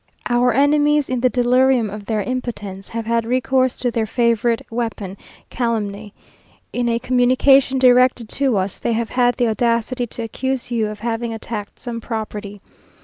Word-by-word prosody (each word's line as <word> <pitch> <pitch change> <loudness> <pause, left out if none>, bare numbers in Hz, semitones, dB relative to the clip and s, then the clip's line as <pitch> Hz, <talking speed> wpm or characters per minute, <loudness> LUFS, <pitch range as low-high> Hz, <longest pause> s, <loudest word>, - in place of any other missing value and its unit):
Our 245 +1 +3
enemies, 295 +3 +3
in 255 - 0
the 255 +1 +3
delirium 250 -2 +2
of 205 -1 -8
their 215 -2 0
impotence, 210 -6 -5
have 230 -1 -4
had 230 0 +1
recourse 255 +2 +1
to 245 - -1
their 225 -1 -1
favourite 235 0 +1
weapon, 225 -5 -4 0.4
calumny. 215 -4 -2 0.6
In 245 -1 0
a 230 - +1
communication 255 +2 +3
directed 250 -2 +4
to 270 -6 +1
us, 190 0 -2
they 235 - -1
have 230 0 -2
had 245 -1 +2
the 245 - +2
audacity 235 +2 0
to 230 - -6
accuse 260 +2 -3
you 225 -3 0
of 210 0 -8
having 230 0 -2
attacked 220 -1 -6
some 235 -1 -6
property. 210 -3 -5
235 Hz, 160 wpm, -20 LUFS, 220-255 Hz, 0.6 s, directed